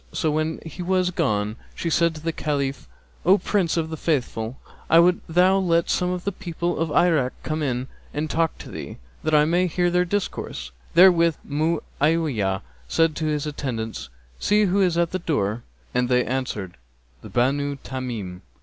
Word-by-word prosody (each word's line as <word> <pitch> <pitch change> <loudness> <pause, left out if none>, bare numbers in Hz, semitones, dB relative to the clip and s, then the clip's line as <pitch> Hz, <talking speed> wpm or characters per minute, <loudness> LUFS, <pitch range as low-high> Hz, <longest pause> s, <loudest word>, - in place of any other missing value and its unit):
So, 155 - 0
when 155 +1 -1
he 160 +3 -7
was 185 0 +1
gone, 105 -7 0 0.2
she 165 - -2
said 170 0 +3
to 155 - -8
the 165 +1 -1
Caliph, 140 -3 -2 0.4
'O 185 +4 +6
Prince 190 -6 0
of 160 -1 -1
the 160 - -4
Faithful, 130 -6 -1 0.3
I 165 - +6
would 175 +1 +5
thou 180 +3 +4
let 170 -3 +2
some 180 - +1
of 180 -1 -3
the 200 - -1
people 175 -3 -3
of 165 0 0
Irak 155 -7 +3
come 155 0 -2
in 130 -3 -1 0.2
and 150 +2 -2
talk 165 0 0
to - - -10
thee, - - -7 0.2
that 155 0 +1
I 150 0 +6
may 175 +3 +2
hear 175 +1 +1
their 180 0 +3
discourse.' 180 - -3 0.2
Therewith 170 -2 +6
Mu'awiyah 150 - 0 0.2
said 165 - +2
to 160 - -2
his 150 -1 -1
attendants, 115 - -4 0.3
'See 210 +1 +3
who 200 0 +2
is 180 -3 +2
at 170 -1 +2
the 185 - -2
door?' 120 - -1 0.3
And 125 0 +1
they 125 -1 +3
answered, 110 - -3 0.4
'The - - -10
Banu 140 +3 +1
Tamim.' 115 -9 -5
155 Hz, 175 wpm, -24 LUFS, 130-175 Hz, 0.4 s, O